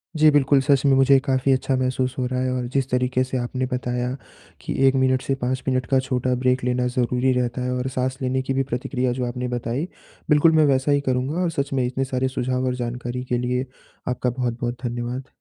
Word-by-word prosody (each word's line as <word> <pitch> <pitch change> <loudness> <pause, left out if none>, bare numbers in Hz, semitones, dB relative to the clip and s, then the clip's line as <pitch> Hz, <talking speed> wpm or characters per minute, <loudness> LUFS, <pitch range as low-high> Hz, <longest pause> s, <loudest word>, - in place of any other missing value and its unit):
जी, 155 0 +6
बिल्कुल 140 -1 +4
सच 140 0 +3
में 140 - +5
मुझे 135 +1 +6
काफ़ी 135 -1 +2
अच्छा 130 +1 0
महसूस 130 0 -1
हो 125 - 0
रहा 125 0 -2
है 130 0 0
और 125 -1 -2
जिस 135 -1 0
तरीके 125 0 +1
से 130 0 -3
आपने 125 +1 -2
बताया 125 0 -2 0.5
कि - - -4
1 135 - +3
मिनट 130 -1 +2
से 135 - -1
5 130 +1 -1
मिनट 130 -2 +1
का 135 +1 +2
छोटा 130 -1 -1
ब्रेक 125 0 +1
लेना 125 0 +1
ज़रूरी 125 +1 +1
रहता 125 +1 -2
है 125 - -1
और 125 +1 -2
साँस 130 +1 0
लेने 130 +1 0
की 130 +1 -2
भी 135 0 +1
प्रतिक्रिया 125 0 -2
जो 125 0 -2
आपने 125 +1 -3
बताई, 120 +6 -2 0.4
बिल्कुल 150 +2 +5
मैं 155 -1 +4
वैसा 135 0 +2
ही 145 0 +3
करूँगा 130 +5 -1
और 175 - +1
सच 140 -2 -2
में 130 -2 +1
इतने 130 +2 -1
सारे 130 0 -1
सुझाव 130 0 -1
और 125 -1 0
जानकारी 125 0 -4
के 125 -1 -1
लिए, 125 +1 -1 0.4
आपका 125 0 0
बहुत-बहुत 120 -1 -3
धन्यवाद। 120 +2 -4
130 Hz, 220 wpm, -23 LUFS, 125-135 Hz, 0.5 s, जी